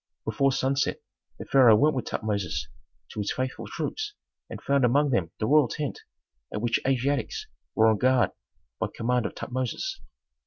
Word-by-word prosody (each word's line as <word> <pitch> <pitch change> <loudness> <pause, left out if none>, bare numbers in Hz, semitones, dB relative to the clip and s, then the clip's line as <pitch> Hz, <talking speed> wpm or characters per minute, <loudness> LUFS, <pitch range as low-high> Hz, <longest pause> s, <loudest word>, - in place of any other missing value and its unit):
Before 140 -1 +2
sunset, 135 +1 0 0.4
the - - -7
pharaoh 125 -5 +6
went 150 +7 +3
with 130 - -2
Tutmosis 100 -5 -2 0.4
to - - -6
his 105 - -1
faithful 130 0 -3
troops 420 -1 -4 0.3
and - - -7
found 140 -1 +1
among 140 +4 +3
them 90 -9 +1
the 110 - 0
royal 145 +1 +5
tent, 145 +3 -4 0.5
at - - -3
which 120 +1 +1
Asiatics 140 - 0 0.3
were 110 - +5
on 110 -2 +4
guard 130 -1 +3 0.5
by - - 0
command 125 +1 0
of - - -10
Tutmosis. 130 - -3
130 Hz, 160 wpm, -27 LUFS, 115-140 Hz, 0.5 s, pharaoh